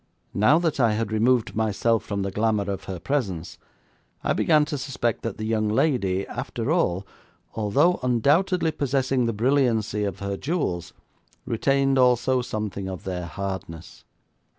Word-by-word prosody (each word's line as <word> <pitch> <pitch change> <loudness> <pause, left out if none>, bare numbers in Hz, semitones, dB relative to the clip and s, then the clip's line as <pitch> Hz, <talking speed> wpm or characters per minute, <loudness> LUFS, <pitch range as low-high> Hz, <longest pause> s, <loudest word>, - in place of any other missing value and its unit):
Now 110 +10 +4
that 165 -4 0
I 115 -4 +4
had 110 0 -2
removed 115 +2 +2
myself 110 +1 +1
from 100 -2 -3
the 100 - -3
glamour 105 -1 0
of 95 - -5
her 95 - -5
presence, 95 - -3 0.6
I - - +1
began 155 -2 +3
to 150 -1 -3
suspect 125 -4 -2
that 115 -4 -4
the 110 - -4
young 110 -1 0
lady, 105 -6 +1
after 120 +5 -4
all, 100 - +1 0.5
although 135 - +2
undoubtedly 160 - +2
possessing 135 -4 0
the - - +1
brilliancy 115 -3 +1
of 100 -4 -2
her 100 0 -4
jewels, 95 - -2 0.5
retained 135 +3 +2
also 125 0 +3
something 105 -4 -4
of 95 -2 -7
their 90 -2 -4
hardness. 95 -2 -6
115 Hz, 150 wpm, -24 LUFS, 100-135 Hz, 0.6 s, Now